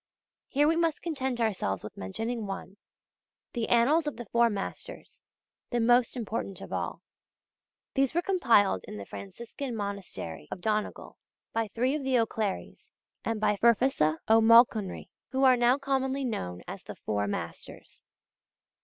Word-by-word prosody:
Here 290 +2 +3
we 325 - +3
must 330 -2 0
content 265 -7 -2
ourselves 190 - -1
with 105 - -8
mentioning 225 - -4
one, 195 0 -6 0.8
the 235 -2 -2
Annals 290 +7 +4
of 295 - -3
the 240 - -6
Four 235 +3 +3
Masters, 210 - -6 0.5
the 240 - 0
most 240 +2 +3
important 220 -4 -4
of - - -8
all. - - -3 0.9
These 270 +2 +1
were 345 - +2
compiled 230 - +3
in - - -8
the 100 - -7
Franciscan 235 - -7
monastery 195 - -5
of - - -5
Donegal, 215 +2 -2 0.3
by 225 -1 0
three 245 +6 0
of 300 -2 -2
the 265 -1 +2
O'Clerys, 220 -3 -2 0.3
and 225 -1 -1
by 210 -1 +2
Ferfesa 230 - +3
O'Mulconry, 225 -2 +5 0.2
who 265 +2 0
are 260 -1 +7
now 245 +2 +4
commonly 270 -1 -1
known 90 - -4
as - - -7
the - - -9
'Four 105 -1 -2
Masters. 85 -4 -7
230 Hz, 145 wpm, -29 LUFS, 200-265 Hz, 0.9 s, are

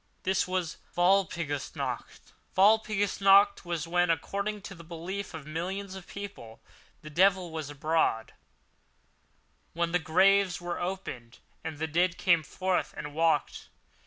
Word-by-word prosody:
This 190 -1 +1
was 185 -3 -2 0.2
Walpurgis 175 -6 +1
Night! - - -5 0.2
Walpurgis 205 0 +3
Night, 200 +1 +6
when, 175 +1 0
according 200 +5 -2
to 195 - -7
the 170 -3 -12
belief 175 +3 -6
of 155 -3 -8
millions 185 +5 -4
of 190 -1 -9
people, 200 - -9 0.4
the 155 - -9
devil 185 +1 +3
was 160 -3 -5
abroad—when 145 -6 0 1.6
the 180 - +2
graves 185 +3 +3
were 175 0 -4
opened 155 -11 -5 0.3
and 160 -2 -5
the 160 - -1
dead 170 +3 +1
came 170 -4 +4
forth 185 +5 -2
and 150 -1 -6
walked. 160 -2 0
175 Hz, 130 wpm, -29 LUFS, 160-195 Hz, 1.6 s, Night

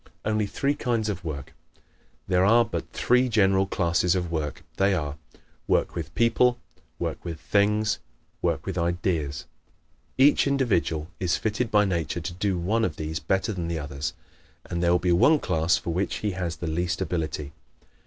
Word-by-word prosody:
Only 110 -1 +1
Three 140 +7 0
Kinds 115 -6 -1
of 95 -3 -4
Work 70 -5 -6 0.2
¶ - - -31 0.5
There 90 0 +3
are 115 +4 +5
but 115 - -5
three 125 +1 +2
general 95 -3 +3
classes 90 -1 +1
of 90 -2 -2
work. 75 -4 -3
They 95 0 +3
are: 75 -4 -3 0.5
WORK - - +2
WITH - - -6
PEOPLE; 120 +1 +3 0.4
WORK - - -4
WITH 85 -3 -5
THINGS; 105 +2 +2 0.4
WORK - - 0
WITH 95 -2 -2
IDEAS. 85 -4 -1 0.7
Each 140 +2 +5
individual 100 - +1
is 90 -2 +1
fitted 110 +2 -1
by 105 -1 +4
nature 85 -2 -1
to 85 +2 -5
do 95 +1 -1
one 105 +7 0
of 85 -8 0
these 80 +1 -3
better 95 +6 0
than 85 -3 -3
the 85 -1 -2
others 70 +1 -4 0.5
and 85 -1 -3
there 85 - +3
will 90 - +5
be 90 0 0
one 120 - +5
class 85 - +1
for 85 - -4
which 95 +4 -1
he 105 - -2
has 90 -3 -3
the 85 - -6
least 85 +2 -1
ability. 80 -5 -3
90 Hz, 175 wpm, -26 LUFS, 85-105 Hz, 0.7 s, are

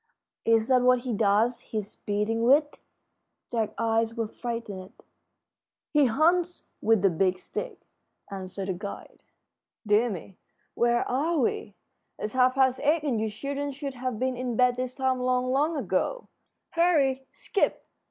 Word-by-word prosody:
"Is 225 -1 +3
that 255 -1 +5
what 250 0 +4
he 245 -1 -3
does 215 +3 +2
his 210 -2 -6
beating 210 +2 -1
with?" 290 +5 +3 0.7
Jack's 225 -3 -1
eyes 225 0 +1
were 230 -2 -1
frightened. 210 -5 -7 0.9
"He 295 -2 +5
hunts 340 +8 +2 0.2
with 220 -3 +3
the 195 - +5
Big 185 +2 +1
Stick," - - -6 0.5
answered 190 0 -5
the - - +1
guide. 200 +3 -8 0.6
"Dear 215 +3 +3
me, 190 -1 -8 0.3
where 240 0 +2
are 310 +7 0
we? 225 -6 -1 0.4
It's 210 - -4
half 255 0 +3
past 260 -1 +3
eight, 305 +1 +2
and 250 -7 0
you 220 - 0
children 280 +6 -4
should 275 0 -5
have 255 -2 -3
been 255 +2 -1
in 245 -1 -3
bed 250 +1 +4
this 255 0 -4
time 260 -1 0
long, 255 0 +1
long 300 +4 +1
ago. - - -1 0.4
Hurry! 285 -6 +2
Skip! 400 - -1
245 Hz, 150 wpm, -27 LUFS, 215-270 Hz, 0.9 s, that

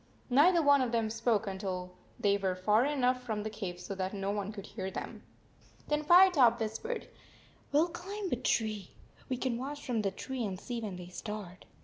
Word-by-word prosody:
Neither 330 +6 +6
one 285 -1 +6
of 250 -2 0
them 225 -2 0
spoke 225 -1 +1
until 190 -2 -4 0.3
they 200 -1 +3
were 190 -2 0
far 210 +6 +3
enough 255 -3 +1
from 220 -4 -3
the 215 - -4
cave 190 -5 -5
so 180 +2 -5
that 190 +1 -3
no 195 0 -1
one 205 0 -2
could 205 -2 -8
hear 190 -3 -5
them. - - -6 0.7
Then 300 0 +2
Firetop 320 -9 +6
whis 220 -1 -2
pered: 475 +1 -4 0.3
" - - -29
We 285 - +3
11 340 +1 0
climb 385 +3 -5
a - - +3
tree. 215 -5 -1 0.3
We 255 - -1
can 245 -2 -1
watch 285 +3 -5
from 235 -4 0
the 200 - +1
tree 255 +6 -5
and 190 -4 -3
see 240 +1 -4
when 205 -4 -4
they 180 0 -9
start. 195 -1 -7
220 Hz, 210 wpm, -32 LUFS, 195-265 Hz, 0.7 s, Neither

